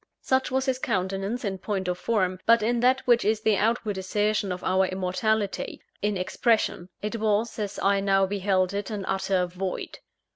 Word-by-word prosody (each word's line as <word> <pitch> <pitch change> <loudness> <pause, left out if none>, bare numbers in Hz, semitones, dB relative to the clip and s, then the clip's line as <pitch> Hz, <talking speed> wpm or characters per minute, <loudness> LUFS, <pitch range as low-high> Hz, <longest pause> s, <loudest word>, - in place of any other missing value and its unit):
Such 260 0 +1
was 265 +1 0
his 260 -2 0
countenance 195 +2 -2
in 190 -2 -3
point 190 -1 -3
of 180 - 0
form; 185 -1 0
but 230 -1 +5
in 235 +2 +1
that 255 +2 +3
which 240 -1 +4
is 215 +1 +1
the 220 -1 +3
outward 215 -2 0
assertion 205 +1 0
of 180 0 -5
our 190 0 +2
immortality 195 +3 -1 0.2
in 205 -1 0
expression 185 -1 0
it 215 +2 -2
was, 220 +1 0
as 205 -1 -3
I 200 0 +2
now 195 -1 +3
beheld 190 -1 0
it, 200 0 -3
an 205 -3 -4
utter 190 -1 0
void. 180 +1 -5
205 Hz, 180 wpm, -26 LUFS, 190-220 Hz, 0.2 s, but